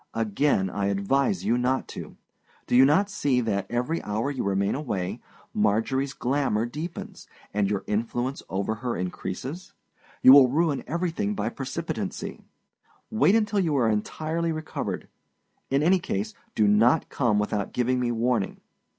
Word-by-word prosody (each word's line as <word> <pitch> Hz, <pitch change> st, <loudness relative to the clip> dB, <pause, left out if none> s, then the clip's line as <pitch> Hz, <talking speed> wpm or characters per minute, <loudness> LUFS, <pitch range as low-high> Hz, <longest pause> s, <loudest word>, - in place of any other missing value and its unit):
Again 115 Hz, -1 st, +1 dB
I 100 Hz, +1 st, -1 dB
advise 135 Hz, -, +1 dB
you 120 Hz, +1 st, +2 dB
not 130 Hz, +2 st, 0 dB
to. -, -, -8 dB, 0.5 s
Do -, -, 0 dB
you 130 Hz, +2 st, +8 dB
not 160 Hz, +9 st, +4 dB
see 145 Hz, -10 st, 0 dB
that, 100 Hz, -4 st, -2 dB
every 125 Hz, +8 st, -1 dB
hour 110 Hz, +7 st, -2 dB
you 135 Hz, -, -3 dB
remain 100 Hz, 0 st, +1 dB
away, 100 Hz, -11 st, -3 dB, 0.3 s
Marjorieâs 115 Hz, +6 st, +1 dB
glamour 125 Hz, -4 st, 0 dB
deepens, 155 Hz, +8 st, -7 dB, 0.3 s
and 100 Hz, -1 st, +1 dB
your 100 Hz, -2 st, -1 dB
influence 120 Hz, +5 st, -2 dB
over 100 Hz, +3 st, -1 dB
her 125 Hz, -2 st, -2 dB
increases? 95 Hz, -, -5 dB, 0.5 s
You 130 Hz, -, +10 dB
will 135 Hz, -3 st, +8 dB
ruin 150 Hz, 0 st, +1 dB
everything 180 Hz, -, -1 dB
by -, -, -1 dB
precipitancy. -, -, -5 dB, 0.7 s
Wait 220 Hz, -2 st, +4 dB
until 210 Hz, -2 st, +2 dB
you 160 Hz, -6 st, +1 dB
are 120 Hz, -3 st, +3 dB
entirely 155 Hz, +10 st, -1 dB
recovered; 155 Hz, 0 st, -4 dB, 0.6 s
in 140 Hz, +2 st, +2 dB
any 185 Hz, +3 st, +4 dB
case, 110 Hz, -, -3 dB, 0.2 s
do 105 Hz, -, +3 dB
not 115 Hz, +9 st, +4 dB
come 120 Hz, -6 st, +1 dB
without 105 Hz, 0 st, -1 dB
giving 125 Hz, +1 st, +1 dB
me 120 Hz, -1 st, 0 dB
warning. 115 Hz, -3 st, 0 dB
125 Hz, 150 wpm, -26 LUFS, 105-150 Hz, 0.7 s, You